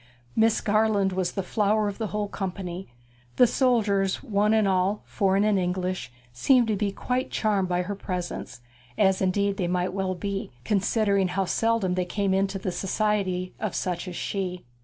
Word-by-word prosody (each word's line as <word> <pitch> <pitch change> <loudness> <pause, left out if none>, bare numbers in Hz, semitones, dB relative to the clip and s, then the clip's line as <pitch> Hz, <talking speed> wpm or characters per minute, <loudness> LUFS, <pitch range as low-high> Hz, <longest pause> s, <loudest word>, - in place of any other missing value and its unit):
Miss 220 0 +3
Garland 210 -2 +2
was 180 -1 -1
the 195 - -2
flower 210 +2 +1
of 200 +1 -5
the 220 - -1
whole 210 0 -2
company; 190 -2 -5 0.5
the - - +7
soldiers 215 -6 +1
one 210 -4 +1
and 220 -2 +3
all, 190 +2 +1
foreign 195 -1 +1
and 210 -2 +3
English, 180 -4 -2 0.2
seemed 245 - +4
to 215 - +2
be 200 0 -1
quite 250 +5 -2
charmed 200 -4 0
by 180 0 +1
her 200 +3 -4
presence, 180 -10 -5 0.4
as 190 -2 +3
indeed 195 +1 +1
they 180 - 0
well 185 +2 -1
might 185 -1 -3
be, 200 +2 -3 0.2
considering 200 -1 +2
how 190 +2 -1
seldom 225 -2 +1
they 180 0 0
came 195 +1 0
into 195 0 +1
the 185 -1 -3
society 190 -2 -1
of 215 -3 -3
such 180 0 -2
as 180 - -6
she. 180 -4 -3
195 Hz, 175 wpm, -26 LUFS, 185-210 Hz, 0.5 s, the